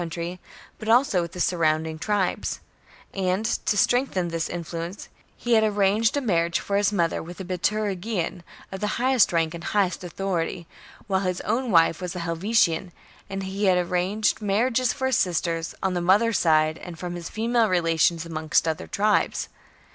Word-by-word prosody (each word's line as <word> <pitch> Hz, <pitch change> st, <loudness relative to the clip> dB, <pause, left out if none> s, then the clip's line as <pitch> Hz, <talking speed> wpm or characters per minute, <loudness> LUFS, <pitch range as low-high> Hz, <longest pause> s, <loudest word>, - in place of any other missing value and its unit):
country, 170 Hz, +1 st, -5 dB, 0.4 s
but 215 Hz, -, -5 dB
also 230 Hz, -6 st, +4 dB
with 170 Hz, -1 st, -5 dB
the 180 Hz, -, -8 dB
surrounding 160 Hz, -2 st, +1 dB
tribes; 200 Hz, -1 st, -1 dB, 0.5 s
and, 190 Hz, +2 st, 0 dB
to 215 Hz, -2 st, 0 dB
strengthen 220 Hz, -8 st, +1 dB
this 165 Hz, -1 st, -2 dB
influence, 170 Hz, +2 st, -6 dB, 0.3 s
he 240 Hz, -, -1 dB
had 220 Hz, -1 st, +5 dB
arranged 210 Hz, +3 st, +2 dB
a -, -, 0 dB
marriage 170 Hz, -8 st, +1 dB
for 200 Hz, -, -3 dB
his 205 Hz, 0 st, +2 dB
mother 170 Hz, -5 st, 0 dB
with 175 Hz, +3 st, -10 dB
a -, -, -4 dB
Biturigian 190 Hz, 0 st, -2 dB, 0.3 s
of 190 Hz, -, -5 dB
the 210 Hz, +1 st, -2 dB
highest 255 Hz, -1 st, +3 dB
rank 165 Hz, -1 st, +1 dB
and 170 Hz, -, -7 dB
the -, -, -6 dB
greatest 190 Hz, -4 st, 0 dB
authority, 175 Hz, -1 st, -3 dB, 0.4 s
while 195 Hz, -3 st, +1 dB
his 185 Hz, -2 st, -2 dB
own 250 Hz, +1 st, -1 dB
wife 165 Hz, -2 st, +4 dB
was 180 Hz, 0 st, -4 dB
a -, -, -3 dB
Helvetian, 175 Hz, 0 st, +1 dB, 0.4 s
and 195 Hz, 0 st, -4 dB
he 195 Hz, +2 st, -2 dB
had 185 Hz, -2 st, +4 dB
arranged 180 Hz, +5 st, 0 dB
marriages 230 Hz, +5 st, +1 dB
for 265 Hz, -, -3 dB
his 260 Hz, -3 st, +2 dB
sister 170 Hz, -2 st, 0 dB, 0.2 s
on 190 Hz, -1 st, +1 dB
the 175 Hz, -, -1 dB
mother's 205 Hz, +5 st, +3 dB
side 155 Hz, -1 st, +3 dB
and 170 Hz, -3 st, -9 dB
his 175 Hz, -1 st, -5 dB
female 230 Hz, 0 st, +1 dB
relations 165 Hz, -2 st, +2 dB
among 160 Hz, -2 st, -6 dB
other 160 Hz, -1 st, -2 dB
tribes. 210 Hz, +1 st, +1 dB
185 Hz, 170 wpm, -25 LUFS, 170-210 Hz, 0.5 s, had